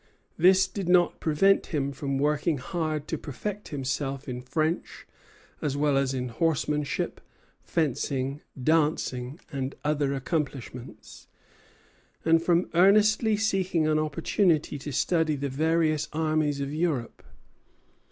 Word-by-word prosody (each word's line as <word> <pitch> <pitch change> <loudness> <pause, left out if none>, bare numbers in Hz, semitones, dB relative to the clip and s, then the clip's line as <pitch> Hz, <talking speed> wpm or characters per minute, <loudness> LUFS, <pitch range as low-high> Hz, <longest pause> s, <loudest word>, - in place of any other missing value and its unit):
This 185 +3 +5
did 195 -4 -5
not 180 -1 +4
prevent 195 +6 +3
him 140 -3 -1
from 140 0 -3
working 150 +2 +1
hard 155 +1 -3
to 160 - -3
perfect 205 +9 -6
himself 135 0 -3
in 125 -1 -4
French, 155 +6 -2 0.6
as 140 -2 -1
well 145 -1 +2
as 135 -1 +1
in 125 -2 -3
horsemanship, 150 +2 -1 0.4
fencing, 140 -3 -1 0.2
dancing, 145 -2 0
and 135 0 -3
other 145 -2 0
accomplishments, 135 -4 -5 1.0
and 165 0 +4
from 170 +1 +2
earnestly 210 +4 +4
seeking 190 -6 +1
an 155 0 +2
opportunity 155 0 +1
to 145 +2 -6
study 160 +2 +1
the 140 0 -3
various 155 +1 +1
armies 155 -2 0
of 140 +1 -3
Europe. 155 -7 -2
150 Hz, 120 wpm, -27 LUFS, 140-165 Hz, 1.0 s, This